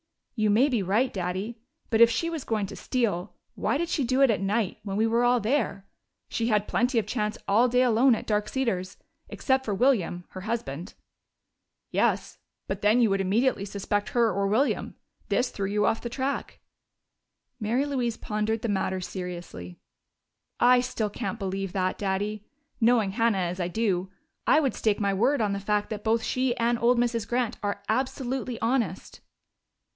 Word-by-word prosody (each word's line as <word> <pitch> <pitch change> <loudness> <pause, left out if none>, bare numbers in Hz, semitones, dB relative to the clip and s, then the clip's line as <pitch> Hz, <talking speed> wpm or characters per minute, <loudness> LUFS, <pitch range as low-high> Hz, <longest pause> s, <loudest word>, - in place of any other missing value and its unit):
"You 215 -3 +1
may 230 +7 +5
be 240 -6 +1
right, 210 +7 +1
Daddy. 190 +5 -3 0.3
But 225 0 +3
if 235 - +9
she 335 +8 -1
was 325 -4 -4
going 215 -3 -1
to 195 - -8
steal, 210 -8 -2 0.2
why - - 0
did 340 +3 -1
she 300 - 0
do 255 +2 +1
it 265 - +5
at 205 - -1
night, 200 0 -1
when 200 -1 -4
we 220 - +3
were 240 +2 +3
there? 220 -4 -1 0.4
She 230 - -1
had 210 -2 +1
plenty 250 0 +1
of 220 - +2
chance 210 0 -2
all 225 +5 +4
day 250 +1 +3
alone 245 +1 +4
at - - -6
Dark 210 -1 0
Cedars 195 -8 -2 0.3
except 265 -1 0
for 210 -5 -2
William, 195 -7 +1
her 185 - -8
husband." 185 -6 -4 1.0
"Yes, - - 0 0.3
but 195 +1 -3
then 210 +4 +4
you 230 -4 +4
would 195 0 +1
immediately 200 +3 +1
suspect 205 +1 -2
her 235 -2 +2
or 200 +1 0
William. 235 +8 0 0.3
This 250 0 +1
threw 195 -1 -3
you 210 +1 +1
off 225 - +1
the 235 - -4
track." 265 +3 -3 1.0
Mary 235 +5 0
Louise 250 -5 -1
pondered 215 +1 -2
the - - 0
matter 190 -1 0
seriously. 175 - -7 0.8
"I 250 +1 +6
still 225 -4 -2
can't 230 - -4
believe 195 -2 -3
that, 185 -1 -1
Daddy. 205 +1 -2 0.4
Knowing 230 -4 +3
Hannah 225 0 +2
as 180 0 -2
I 175 - 0
do, 190 -2 -1 0.4
I - - +6
would 275 -5 +1
stake 215 -2 0
my 200 -1 +1
word 250 +8 +2
on 205 -2 +1
the 200 - -2
fact 210 +1 -1
that 210 -1 -4
both 225 0 +1
she 255 -1 0
and 235 0 +1
old 240 +1 +3
Mrs. 235 -3 0
Grant 240 -2 -1
are 200 0 -3
absolutely 255 0 -2
honest." 225 -6 -1
220 Hz, 180 wpm, -27 LUFS, 195-245 Hz, 1.0 s, if